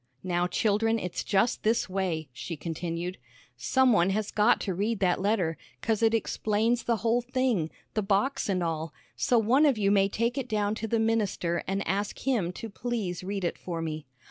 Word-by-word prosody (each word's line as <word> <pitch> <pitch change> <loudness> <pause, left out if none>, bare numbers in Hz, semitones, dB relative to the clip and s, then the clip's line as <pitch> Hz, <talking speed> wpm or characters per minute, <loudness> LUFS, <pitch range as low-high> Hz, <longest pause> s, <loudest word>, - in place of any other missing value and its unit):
"Now, 175 -1 0
children, 225 +4 +1
it's 180 -5 -4
just 200 +4 +1
this 225 +2 +1
way," 185 -5 -2
she 165 +6 -6
continued, 170 +3 -4 0.4
"some 255 - +3
one 175 -1 +4
has 210 +2 -1
got 215 +3 +4
to 190 - -2
read 210 +5 0
that 185 -1 +2
letter, 185 -6 0 0.2
'cause 225 -1 0
it 225 0 +4
explains 225 +1 0
th' - - -9
whole 230 +3 +1
thing, 250 -9 0 0.3
th' 215 -3 -1
box 210 +5 +1
an' 185 -2 +1
all, 165 -1 -3 0.2
so 245 - +2
one 250 +7 +4
of 270 -5 +2
you 200 -1 +2
may 195 -1 +4
take 235 +6 -1
it 255 -2 -5
down 210 -1 +1
to 225 +1 -4
the 230 - +1
minister 215 -6 0
an' 195 +1 -1
ask 200 +4 -2
him 230 -10 0
to 225 - -6
please 210 -5 -3
read 195 0 -3
it 175 - -2
for 170 -2 -4
me." 155 -3 -4
205 Hz, 195 wpm, -28 LUFS, 180-225 Hz, 0.4 s, one